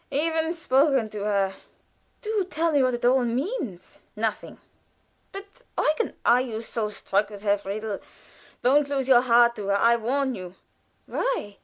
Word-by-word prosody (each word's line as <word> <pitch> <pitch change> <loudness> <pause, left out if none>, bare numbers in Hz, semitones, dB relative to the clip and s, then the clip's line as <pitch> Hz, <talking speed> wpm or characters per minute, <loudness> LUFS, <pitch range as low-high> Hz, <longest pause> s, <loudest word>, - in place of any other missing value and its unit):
"Even 320 +2 0
spoken 270 -7 +2
to 205 0 -5
her." 200 -2 +1 0.7
"Do 425 -2 0
tell 330 0 0
me 290 -2 +3
what 255 -1 +2
it 240 - -4
all 255 +1 +4
means." 245 - -4 0.2
"Nothing." 215 0 -3 0.7
"But, 390 +1 -7 0.3
Eugen 305 +1 0
" - - -43
"Are 245 +1 +5
you 230 -4 -4
so 225 -2 -3
struck 205 0 -1
with 205 -1 -10
her, 205 -1 +3
Friedel? 205 +1 -4 0.6
Don't 280 +3 +3
lose 270 -2 -1
your 250 -2 +6
heart 235 -1 +4
to 205 -2 -5
her, 200 - +2
I 235 +3 +4
warn 265 +4 -1
you." 185 -3 -8 0.5
"Why?" 470 - -3
240 Hz, 165 wpm, -25 LUFS, 210-285 Hz, 0.7 s, your